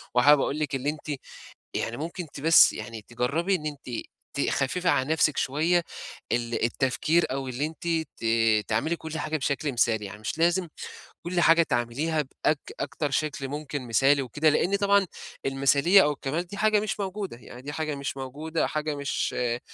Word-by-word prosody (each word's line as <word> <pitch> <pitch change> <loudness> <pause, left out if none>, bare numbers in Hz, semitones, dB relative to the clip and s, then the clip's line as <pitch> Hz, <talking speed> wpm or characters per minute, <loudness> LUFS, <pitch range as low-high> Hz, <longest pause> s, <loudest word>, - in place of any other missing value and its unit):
وحابب 140 +3 +6
أقول 150 - -1
لِك 150 -3 -1
اللي 135 +2 -1
أنتِ 150 -2 -5 0.6
يعني 115 +1 -2
ممكن 170 +3 -5
ت - - -8
بس 160 +2 +7
يعني 115 -2 -7
تجرّبي 140 +11 0
إن 155 -4 -3
أنتِ 135 -5 -5 0.3
تخفّفي 140 +5 0
عن 130 -5 +2
نفسِك 155 -2 +2
شوية 160 +6 +2 0.5
ال 120 -1 0
التفكير 135 +7 +1
أو 135 0 -3
اللي 130 +4 -2
أنتِ 160 +2 -9 0.3
ت 115 - -10 0.4
تعملي 115 +10 0
كل 160 -1 -6
حاجة 155 +1 -1
بشكل 140 0 -1
مثالي، 115 -3 +1
يعني 105 +1 -8
مش 110 +8 -4
لازم 175 +1 +2 0.5
كل 175 +1 -1
حاجة 165 0 +6
تعمليها 145 +4 0
بأك 145 +2 -1 0.2
أكتر 145 0 -2
شكل 140 -1 -1
ممكن 145 -2 -5
مثالي 135 +5 +3
وكده، 145 +5 +1
لإن 180 +6 +2
طبعًا 200 -1 +3 0.4
المثالية 140 +8 +5
أو 150 - +2
الكَمال 145 +3 -2
دي 200 +3 -9
حاجة 215 0 +3
مش 210 0 -3
موجودة، 195 - -4
يعني 125 +1 -12
دي 145 +2 -6
حاجة 155 0 -2
مش 140 -1 -4
موجودة، 150 +5 -2
حاجة 155 0 -2
مش 140 -1 -2
آآ 120 -1 0
145 Hz, 175 wpm, -26 LUFS, 130-165 Hz, 0.6 s, بس